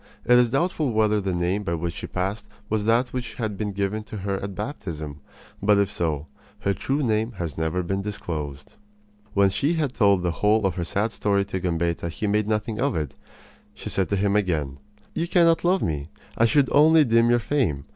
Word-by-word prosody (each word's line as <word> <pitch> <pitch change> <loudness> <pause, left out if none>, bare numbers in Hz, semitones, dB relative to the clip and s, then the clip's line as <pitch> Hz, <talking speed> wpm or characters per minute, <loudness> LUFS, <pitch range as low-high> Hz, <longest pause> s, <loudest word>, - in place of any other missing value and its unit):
It 125 +1 +6
is 120 -1 +4
doubtful 145 -1 0
whether 105 -1 +2
the 95 -1 -2
name 90 +3 0
by 85 -4 -2
which 85 0 -3
she - - -6
passed 100 +3 -3 0.2
was 110 -1 0
that 120 +3 +3
which 125 -4 -5
had 110 -3 -3
been 105 +1 -3
given 100 +2 -2
to 110 0 -7
her 100 0 -2
at 100 -1 -5
baptism; 80 - -5 0.4
but, 105 +1 +4
if 100 0 +2
so, 80 -7 -2 0.4
her 100 - +1
true 140 +9 -1
name 110 0 0
has 85 -7 -5
never 80 +3 -1
been 95 +3 -2
disclosed. 80 -9 -6 0.6
When 100 -1 +4
she 145 - +1
had 150 -6 -1
told 100 -4 +3
the 90 - +1
whole 105 0 +3
of 95 - +1
her 85 - -3
sad 100 +6 -1
story 100 -1 +1
to 95 -2 -3
Gambetta 85 -1 -1
he 85 +6 -4
made 105 0 +1
nothing 110 0 -1
of 140 -3 +1
it. 75 -3 -2 0.6
She - - -6
said 95 - 0
to 100 - +1
him 100 +1 +1
again: 75 -9 0 0.3
"You 170 - -1
cannot 170 -2 +4
love 180 +2 +2
me. 75 -3 -2 0.3
I 115 - +4
should 135 +3 +3
only 155 +2 +6
dim 115 -2 +3
your 120 - +5
fame. 115 - -1
100 Hz, 205 wpm, -24 LUFS, 90-115 Hz, 0.6 s, It